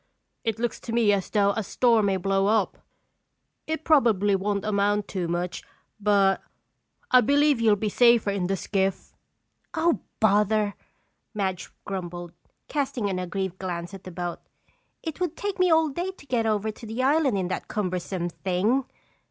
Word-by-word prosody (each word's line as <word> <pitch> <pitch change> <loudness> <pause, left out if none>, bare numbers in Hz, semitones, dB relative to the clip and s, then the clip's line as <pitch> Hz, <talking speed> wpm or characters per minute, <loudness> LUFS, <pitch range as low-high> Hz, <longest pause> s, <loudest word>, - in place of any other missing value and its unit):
"It 225 -2 -1
looks 235 0 -2
to 230 - -7
me 225 -3 +4
as 195 -2 -1
though 200 -2 +3
a 220 - -2
storm 225 0 +2
may 195 -1 +1
blow 195 +1 +1
up. 215 -2 +1 0.9
It 315 0 -3
probably 220 -11 +4
won't 200 +1 -1
amount 205 0 +1
to 180 -3 -2
much 175 +1 -2 0.4
but 200 -2 +3 0.7
I 255 - +7
believe 285 0 +3
you'll 220 -2 +5
be 215 +1 -2
safer 235 -2 +4
in 195 -3 -1
the 195 +1 0
skiff." 195 0 -2 0.6
"Oh, 330 +1 +2 0.2
bother!" 210 -1 +3 0.6
Madge 190 -3 -2 0.2
grumbled, 175 -3 -5 0.4
casting 255 -8 -1
an 185 - -2
aggrieved 185 0 -3
glance 175 -1 -4
at 195 - -9
the - - -8
boat. 175 0 -4 0.6
"It 320 -1 -5
would 350 -3 -2
take 405 -2 -3
me 365 0 +4
all 320 -1 +4
day 345 +7 -3
to 380 -6 -11
get 240 -4 0
over 215 0 0
to 225 +1 -11
the 225 +4 -2
island 275 -5 +3
in 185 -2 -1
that - - -4
cumbersome 185 -3 -2
thing!" 195 +10 0
205 Hz, 165 wpm, -26 LUFS, 190-240 Hz, 0.9 s, I